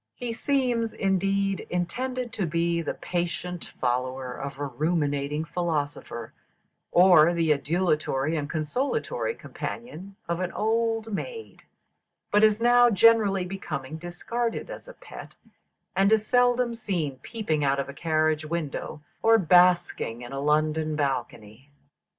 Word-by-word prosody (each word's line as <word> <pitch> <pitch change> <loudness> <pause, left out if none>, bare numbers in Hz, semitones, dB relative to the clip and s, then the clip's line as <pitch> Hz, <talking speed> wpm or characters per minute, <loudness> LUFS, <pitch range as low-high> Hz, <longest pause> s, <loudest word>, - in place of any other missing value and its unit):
He 245 -2 -4
seems, 245 -3 0
indeed, 195 0 0
intended 245 +8 -3
to 195 -5 -1
be 170 +1 0
the - - -3
patient 175 0 -3
follower 130 +1 -1
of 140 +1 -6
a 145 - -3
ruminating 145 +1 -1
philosopher, 150 -8 -3 0.6
or 175 -2 +6
the 165 -2 +2
adulatory 155 -1 0
and 145 -2 -3
consolatory 275 - -2
companion 200 -4 -7
of 170 0 -1
an 185 -1 -2
old 225 0 0
maid; 455 - -6 0.7
but 210 +1 +4
is 215 0 +5
now 245 +1 +6
gradually 210 -3 +4
becoming 160 -6 -5
discarded 225 +8 -4
as - - -9
a - - -10
pet, - - -11 0.6
and 195 +2 +3
is 220 -1 +3
seldom 245 0 +3
seen 170 - -3
peeping 160 - -2
out 140 0 +2
of 140 - -2
a 140 - -8
carriage 155 0 +1
window 155 -2 -4 0.2
or 225 0 +6
basking 175 - +3
in 120 - -9
a 135 - -3
London 155 +1 +1
balcony. 130 -3 -3
175 Hz, 130 wpm, -26 LUFS, 150-220 Hz, 0.7 s, or